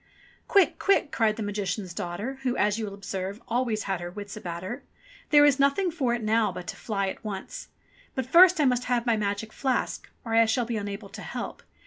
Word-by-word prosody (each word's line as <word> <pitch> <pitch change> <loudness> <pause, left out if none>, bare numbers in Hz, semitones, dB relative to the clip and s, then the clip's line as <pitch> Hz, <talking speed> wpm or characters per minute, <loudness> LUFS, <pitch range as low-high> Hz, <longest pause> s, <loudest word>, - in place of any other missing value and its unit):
*'Quick! 395 -2 +4
Quick!" 390 -7 +2
cried 220 -2 +2
the 220 - -4
Magician's 205 -2 -3
daughter, 205 +11 -4
who, 255 -2 -1
as 210 +1 +2
you 220 - -2
will 200 - -7
observe, 195 0 -5
always 235 -3 0
had 190 -3 -2
her 175 - -4
wits 205 +2 -8
about 175 -4 -6
her. 240 +8 -5 0.5
"There 290 -1 +7
is 285 -1 +4
nothing 280 +7 +3
for 260 -7 0
it 235 - -5
now 215 -1 +2
but 180 0 -7
to - - -5
fly 200 -3 -2
at - - -8
once. 210 - -6 0.5
But 260 - -1
first 350 +6 +7
I 295 - +4
must 250 -1 +2
have 245 -1 0
my 235 -2 +3
magic 210 +1 -2
flask, 265 -2 -1 0.2
or 225 - -3
I 230 0 +6
shall 235 +2 +1
be 230 -1 -2
unable 200 0 -5
to - - -9
help. - - -6
220 Hz, 220 wpm, -27 LUFS, 200-255 Hz, 0.5 s, There